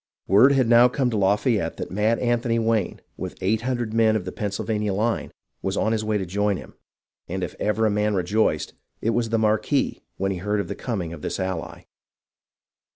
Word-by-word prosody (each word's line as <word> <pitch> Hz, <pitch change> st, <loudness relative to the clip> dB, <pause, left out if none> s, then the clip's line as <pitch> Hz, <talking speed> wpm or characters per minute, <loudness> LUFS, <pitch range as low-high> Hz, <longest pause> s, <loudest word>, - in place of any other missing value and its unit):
Word 125 Hz, +8 st, +6 dB
had 130 Hz, -3 st, +3 dB
now 120 Hz, +1 st, +7 dB
come 125 Hz, 0 st, 0 dB
to 110 Hz, -, -1 dB
Lafayette 100 Hz, -2 st, +1 dB
that -, -, -5 dB
Mad 105 Hz, +4 st, +2 dB
Anthony 120 Hz, -1 st, +1 dB
Wayne, 115 Hz, -1 st, 0 dB, 0.2 s
with -, -, -6 dB
eight 105 Hz, +4 st, +1 dB
hundred 120 Hz, -3 st, -2 dB
men 110 Hz, -1 st, +4 dB
of 100 Hz, -4 st, -2 dB
the 90 Hz, -, -4 dB
Pennsylvania 105 Hz, -1 st, -2 dB
line, 115 Hz, +3 st, -1 dB, 0.3 s
was 95 Hz, +1 st, -2 dB
on 110 Hz, -, +1 dB
his 110 Hz, -1 st, 0 dB
way 110 Hz, -1 st, 0 dB
to 95 Hz, -, -3 dB
join 100 Hz, +2 st, 0 dB
him, -, -, -11 dB, 0.5 s
and 95 Hz, +1 st, -3 dB
if 90 Hz, -, -4 dB
ever 110 Hz, +1 st, +1 dB
a 110 Hz, -, +3 dB
man 105 Hz, 0 st, +1 dB
rejoiced, 100 Hz, +4 st, 0 dB, 0.3 s
it 115 Hz, -, 0 dB
was 115 Hz, 0 st, 0 dB
the 115 Hz, -, +1 dB
Marquis 110 Hz, +6 st, +1 dB, 0.2 s
when 95 Hz, +1 st, 0 dB
he 95 Hz, -, -3 dB
heard 105 Hz, +3 st, -1 dB
of 100 Hz, -, -3 dB
the -, -, -2 dB
coming 95 Hz, -9 st, -4 dB
of 80 Hz, -, -9 dB
this -, -, -3 dB
ally. 95 Hz, -3 st, -4 dB
105 Hz, 205 wpm, -24 LUFS, 100-115 Hz, 0.5 s, now